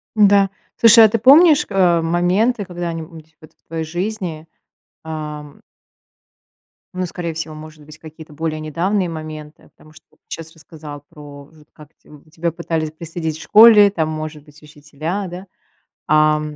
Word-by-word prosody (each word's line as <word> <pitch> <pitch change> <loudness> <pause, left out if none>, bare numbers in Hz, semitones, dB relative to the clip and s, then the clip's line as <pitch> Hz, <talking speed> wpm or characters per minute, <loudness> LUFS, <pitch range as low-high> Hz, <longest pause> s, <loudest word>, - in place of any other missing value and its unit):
Н-да, 200 -2 +4 0.3
слушай, 230 0 +7
а - - +3
ты 230 - 0
помнишь, 295 - +6
э, 180 -4 +2
моменты, 185 +7 0
когда-нибудь 165 -2 -8
вот 155 - -16
в - - -51
твоей 160 0 -4
жизни, 175 -2 -5 0.6
ам 150 -2 -8 1.3
ну, 185 0 -3
скорее 170 -1 -6
всего, 160 -1 -6
может 155 -1 -13
быть, 155 +1 -14
какие-то 160 -1 -13
более 155 0 -4
недавние 175 +5 -2
моменты, 155 -1 -9
а - - -21
потому 155 0 -21
что 155 - -19
вот - - -31
ты - - -72
щас 160 0 -12
рассказал 150 -2 -12
про 145 -3 -13
в 155 0 -21
как 150 -1 -16
те, - - -23
м, 150 -1 -17
тебя 170 +1 -3
пытались 165 -2 -4
пристыдить 160 -1 -6
в - - -12
школе, 210 -2 +7
там, 160 -5 -2
может 155 -1 -6
быть, 150 0 -20
учителя, 155 +6 -6
да? 180 +2 -9 0.6
Ам. 155 0 +1
160 Hz, 165 wpm, -18 LUFS, 155-180 Hz, 1.3 s, слушай